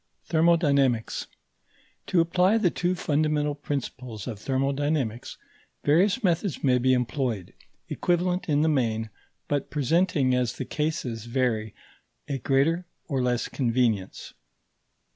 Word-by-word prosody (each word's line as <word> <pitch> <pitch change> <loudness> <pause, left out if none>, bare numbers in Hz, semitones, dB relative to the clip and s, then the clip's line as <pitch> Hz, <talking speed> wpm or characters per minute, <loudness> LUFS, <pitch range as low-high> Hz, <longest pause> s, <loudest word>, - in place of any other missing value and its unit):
THERMODYNAMICS 145 -8 +2 0.8
To 175 - +3
apply 180 +5 +3
the 185 -6 +2
two 180 +1 0
fundamental 150 -2 0
principles 130 -6 -5
of 110 -5 -6
thermodynamics, 135 -2 -1 0.5
various 185 - +3
methods 175 -2 0
may 125 -2 +3
be 130 +1 +2
employed, 125 -5 -1 0.3
equivalent 180 0 0
in 150 0 +3
the - - +3
main, 115 -7 0 0.4
but 145 -2 -1
presenting 150 -2 +2
as 125 -2 +1
the 130 - -5
cases 130 -8 -3
vary 115 -4 -1 0.5
a 140 -2 -2
greater 145 +8 +1 0.2
or 135 -5 -1
less 125 -1 0
convenience. 115 -6 -1
140 Hz, 115 wpm, -26 LUFS, 125-160 Hz, 0.8 s, To